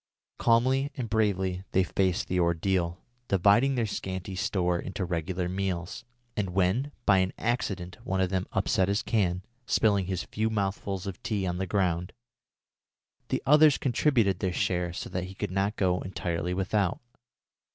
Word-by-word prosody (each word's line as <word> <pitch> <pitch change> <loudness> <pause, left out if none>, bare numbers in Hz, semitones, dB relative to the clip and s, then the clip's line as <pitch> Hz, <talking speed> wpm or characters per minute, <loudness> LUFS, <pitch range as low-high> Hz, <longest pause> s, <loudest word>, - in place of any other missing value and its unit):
Calmly 130 +4 +3
and 125 -5 -3
bravely 95 -4 +1
they 95 - +4
faced 95 +2 0
the 90 - 0
ordeal, 85 +1 0 0.2
dividing 100 +8 +4
their 120 -2 +1
scanty 95 -2 -4
store 90 -4 0
into 95 +1 -4
regular 90 +1 -2
meals, 90 -2 -3 0.3
and 100 -3 -1
when, 100 +10 +1
by 95 -3 +5
an 95 0 +1
accident 100 -7 -2
one 95 0 -1
of 95 -1 +1
them 95 0 -1
upset 95 -1 +1
his 100 +1 0
can, 95 -4 0 0.2
spilling 100 -4 +2
his 95 -2 -2
few 110 +1 -1
mouthfuls 100 -2 -2
of 95 -2 -6
tea 105 -4 -1
on 90 0 -2
the 95 - -2
ground, 90 -2 0 1.2
the - - -1
others 150 +1 +6
contributed 120 - +2
from - - 0
their 90 - -2
share 90 -1 0
so 85 - -5
that 90 0 -3
he 95 +1 -9
should 105 -3 -2
not 100 +3 0
go 90 -2 +1
entirely 90 -2 -3
without. 95 0 0
95 Hz, 160 wpm, -28 LUFS, 90-105 Hz, 1.2 s, others